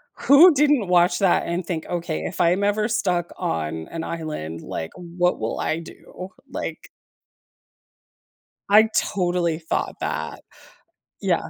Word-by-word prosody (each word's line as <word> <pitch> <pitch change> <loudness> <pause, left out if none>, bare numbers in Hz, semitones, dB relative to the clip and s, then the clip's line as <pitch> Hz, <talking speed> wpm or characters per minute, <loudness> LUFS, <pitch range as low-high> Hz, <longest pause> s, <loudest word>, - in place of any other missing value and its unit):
who 310 +6 +7
didn't 290 -7 +3
watch 175 0 +3
that 190 -3 +3
and 175 +2 -2
think, 165 -2 -4
"Okay, 170 - -3
if 80 - -3
I'm 180 +3 +3
ever 210 +2 +1
stuck 180 -6 -1
on 80 0 -3
an 165 -1 -5
island, 150 - -5
like, 80 - -5
what 175 0 -1
will 110 +1 -3
I 160 - -1
do?" 180 +2 -11 0.2
Like - - -6 1.8
I 215 +2 +6
totally 175 -4 0
thought 160 - -2
that, - - -4 0.8
yeah. - - 0
175 Hz, 130 wpm, -23 LUFS, 160-200 Hz, 1.8 s, who